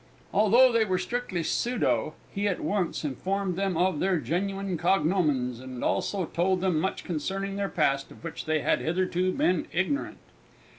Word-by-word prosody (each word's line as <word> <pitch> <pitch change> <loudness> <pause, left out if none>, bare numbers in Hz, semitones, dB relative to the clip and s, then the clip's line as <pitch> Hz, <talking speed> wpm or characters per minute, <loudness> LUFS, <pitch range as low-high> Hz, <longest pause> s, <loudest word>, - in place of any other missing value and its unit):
Although 235 +5 +6
they 230 -1 +3
were 185 -4 0
strictly 185 -2 -2
pseudo, 225 -6 0 0.2
he 200 +1 -1
at 195 - -1
once 185 -6 -1
informed 185 +7 -2
them 190 -2 -1
of 180 -3 +2
their 190 -1 +2
genuine 190 +7 -2
cognomens, 155 -8 +1
and 130 -1 -7
also 195 -3 0
told 185 +3 +1
them 180 -4 +1
much 190 +4 -2
concerning 195 +4 -3
their 200 0 -1
past 140 -4 +1
of - - -15
which 165 - -6
they 155 -1 +1
had - - +2
hitherto 185 +2 0
been 180 -2 +1
ignorant. 190 - -1
185 Hz, 160 wpm, -27 LUFS, 160-195 Hz, 0.2 s, Although